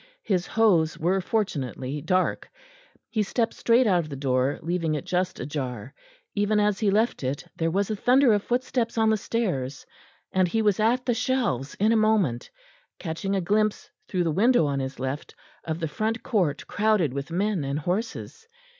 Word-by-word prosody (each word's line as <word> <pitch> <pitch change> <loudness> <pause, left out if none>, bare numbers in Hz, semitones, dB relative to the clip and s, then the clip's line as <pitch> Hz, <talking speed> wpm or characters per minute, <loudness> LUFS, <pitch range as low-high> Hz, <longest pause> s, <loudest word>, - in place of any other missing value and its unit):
His 180 -4 0
hose 180 -8 +3
were 185 +4 +1
fortunately 145 - -2
dark. 185 +4 0 0.6
He 220 - -1
stepped 225 +3 0
straight 240 +2 +3
out 185 -5 +3
of 155 -3 -4
the 140 - -5
door, 130 0 0
leaving 165 -2 -1
it 145 - -4
just 185 0 -1
ajar. 130 -4 -5 0.4
Even 205 +1 +1
as 210 -2 +1
he 215 - +2
left 215 - +1
it 130 +2 -3
there 165 0 0
was 200 +5 0
a - - 0
thunder 250 +3 +4
of 205 - +2
footsteps 245 0 -1
on 220 -1 +4
the - - +4
stairs, 170 - -2 0.5
and 185 -1 +3
he 220 +5 0
was 205 -2 +2
at 240 +4 +2
the 245 - +2
shelves 230 - -1
in 215 +3 +2
a - - +4
moment, 215 - +2 0.5
catching 190 +4 -3
a 190 - +1
glimpse 210 +3 0 0.2
through 180 -2 0
the 165 - 0
window 230 +3 +4
on 140 -1 -1
his 135 0 -5
left 130 +3 -4 0.3
of 160 0 -3
the 165 - -1
front 220 +8 -2
court 180 - 0
crowded 205 -9 +1
with 140 +2 -4
men 190 0 0
and 140 +1 -2
horses. 200 - -4
190 Hz, 180 wpm, -26 LUFS, 150-220 Hz, 0.6 s, thunder